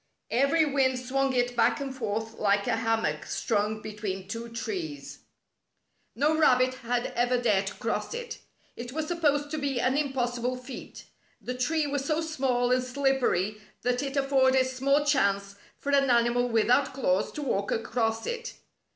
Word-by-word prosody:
Every 280 +7 +3
wind 270 -3 +2
swung 270 +2 0
it 245 -1 0
back 235 - +3
and 270 -2 -5
forth 220 -2 -3
like 200 -1 +2
a 225 - +1
hammock 225 -10 0
strung 215 0 -1
between 205 -3 -5
two 230 +3 -5
trees. 320 - -5 1.0
No 295 +5 +2
rabbit 255 -5 +4
had 245 -1 -2
ever 245 +1 +2
dared 205 -5 +2
to 200 - -5
cross 230 - -3
it. 475 -1 -6 0.4
It 240 +1 -7
was 315 +1 -2
supposed 290 -4 +1
to 310 - -2
be 275 -3 -1
an 255 +2 +1
impossible 250 -3 -1
feat. 250 +1 -9 0.4
The 250 - -5
tree 300 +5 0
was 285 -1 -2
so 305 +2 0
small 260 -6 0
and 255 0 +3
slippery 250 -7 0 0.2
that 250 +1 +1
it 280 0 -3
afforded 265 -1 +3
small 275 +3 +1
chance 200 -9 +1 0.2
for 285 - -3
an 275 -1 +3
animal 240 +1 +3
without 245 +4 +2
claws 195 -7 +1
to 300 - -5
walk 200 -7 -1
across 225 0 -1
it. 475 0 -4
255 Hz, 160 wpm, -28 LUFS, 230-280 Hz, 1.0 s, rabbit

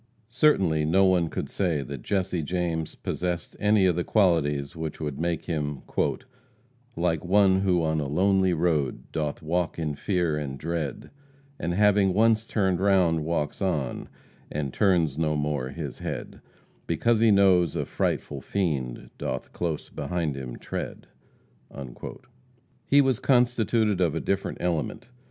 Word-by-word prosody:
Certainly 95 - +3
no 95 +5 +4
one 90 -3 +3
could - - -4
say 85 -7 -1
that 70 -1 -7
Jesse 95 +2 -1
James 85 0 -2
possessed 90 -1 -3
any 105 -2 +4
of 90 -3 +3
the 85 - 0
qualities 75 -10 +1
which 80 -2 -5
would 75 -3 -4
make 85 -1 -1
him 75 -5 -3 1.1
"Like 85 -2 0
one 95 +1 +4
who 90 -3 +2
on 80 0 +1
a 75 - -2
lonely 95 +5 +2
road 80 -6 0
Doth 75 -2 -3
walk 85 +2 -1
in 80 -3 -2
fear 85 +1 0
and 70 -2 -5
dread, 80 -2 -4 0.5
And 85 +1 -2
having 100 -2 +4
once 110 +1 +3
turned 95 -5 +1
round, 90 -5 +3
walks 80 0 -2
on, 80 -9 -2 0.4
And 70 -3 -3
turns 85 -8 +2
no 75 -1 +1
more 75 -3 -1
his 75 -2 -6
head, - - -6 0.5
Because 110 +8 +2
he 115 0 +5
knows 95 -5 +4
a - - -1
frightful - - -2
fiend 70 -11 -2
Doth - - -4
close 85 -3 -3
behind 80 0 -2
him 65 -3 -6
tread." - - -6 1.8
He 140 +1 +6
was 130 -3 +1
constituted 120 -6 +2
of 85 -4 +2
a - - 0
different 100 0 -2
element. 85 +6 -2
85 Hz, 145 wpm, -26 LUFS, 75-95 Hz, 1.8 s, He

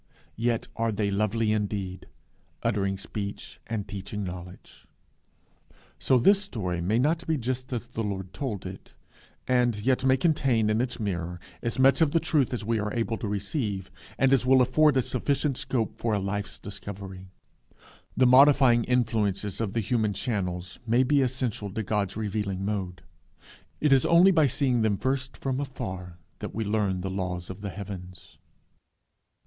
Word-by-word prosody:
Yet 115 -1 0
are 115 0 +1
they 105 -1 -1
lovely 110 +2 +1
indeed, 100 -3 -2 0.6
uttering 100 -4 0
speech 100 +1 -6
and 110 -3 -3
teaching 100 +1 -5
knowledge. 90 0 -9 1.1
So 130 - +3
this 195 - +5
story 95 - -3
may 100 +6 +1
not 160 +6 +1
be 160 -1 +1
just 130 +1 -3
as 120 -1 -3
the 115 -2 -4
Lord 95 -3 -4
told 110 -10 -4
it, 95 +1 -9 0.5
and 125 -3 +2
yet 130 0 +2
may 130 0 +4
contain 130 -8 +2
in 110 +2 +2
its 125 -1 -3
mirror 90 -4 -3 0.2
as 115 - -2
much 135 +4 +5
of 155 -3 +3
the 165 - +4
truth 155 -5 +1
as 120 -4 -3
we 115 0 +1
are 105 0 -2
able 115 -1 0
to 110 - -4
receive, 100 - -3 0.3
and 135 0 +4
as 135 - +4
will 130 0 +5
afford 145 +3 +4
us 130 - +2
sufficient 140 +2 0
scope 115 -3 -2
for 115 -2 0
a - - 0
life's 100 +1 -3
discovery. 95 -2 -8 0.9
The 130 - +5
modifying 130 -2 +6
influences 110 -5 0
of 105 -4 -2
the 115 - +1
human 110 -1 0
channels 90 -6 -3
may 120 +3 +4
be 140 +2 +3
essential 125 -6 -2
to 110 +3 -3
God's 100 -1 -1
revealing 100 -3 -2
mode. 95 -3 -3 0.8
It 150 -2 +4
is 135 - +4
only 175 +3 +7
by 160 -5 +4
seeing 130 -2 +1
them 110 -2 +2
first 130 +2 -2
from 135 -1 -2
afar 95 -11 -5 0.2
that - - -6
we 110 - -1
learn 100 -3 0
the 95 +1 -3
laws 90 -2 -3
of 95 - -10
the 100 - -4
heavens. 95 -2 -9
110 Hz, 165 wpm, -27 LUFS, 100-130 Hz, 1.1 s, only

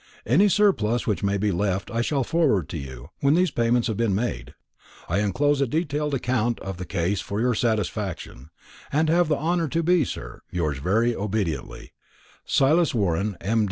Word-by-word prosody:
Any 175 - +4
surplus 180 - +2
which 105 - -1
may 100 0 +1
be 105 +1 0
left 95 0 -1
I 115 0 0
shall 135 +2 0
forward 135 - +1
to - - -4
you, 65 +1 -9
when 140 +1 +3
these 180 -2 +2
payments 120 -1 +1
have 110 -4 -2
been 115 -5 +1
made. 120 +4 -3 0.5
I 90 +4 0
enclose 140 +8 +1
a 140 - +2
detailed 150 0 -1
account 120 -2 0
of 95 -1 -5
the 90 - -6
case 95 +1 -1
for 100 - -4
your 125 +2 +2
satisfaction, 105 - -2 0.4
and 155 +2 +2
have 175 +1 +3
the 150 -2 +1
honour 165 +2 0
to 165 +4 -1
be, 175 -1 +3
sir, - - -7
"Yours 75 -6 -2
very 110 - +1
obediently, 100 - -3 0.5
"SILAS 155 +2 +3
WARREN, 100 -1 0
M. 115 +3 +1
115 Hz, 180 wpm, -24 LUFS, 95-145 Hz, 0.5 s, Any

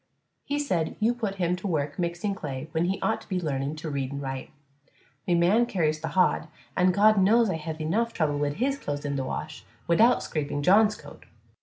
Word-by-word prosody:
He 290 - -2
said 180 - -1
you 225 +2 +3
put 220 -5 -3
him 180 -2 0
to 190 - -5
work 150 -4 -2
mixing 175 +3 -1
clay 145 -6 -6
when 160 +2 0
he 190 +2 -1
ought 225 - 0
to - - -17
be 185 -2 0
learning 140 -3 -2
to 155 +1 -6
read 135 -2 -2
an' 140 - -4
write. 135 -1 -5 0.8
Me 175 - +3
man 195 +8 +3
carries 155 -6 0
th' - - -3
hod, 180 -2 +2 0.3
an' 185 0 +4
God 210 +2 +5
knows 220 +2 +4
I 165 - -2
hev 160 0 -5
enuf 200 +10 0
trouble 150 -8 0
wid 145 0 0
his 270 - -1
clothes 145 - -4
in 140 -1 -2
th' - - -1
wash 150 +4 -5 0.2
widout 220 +9 +4
scraping 145 -1 -3
John's 210 +5 +5
coat. - - -14
170 Hz, 210 wpm, -27 LUFS, 150-205 Hz, 0.8 s, God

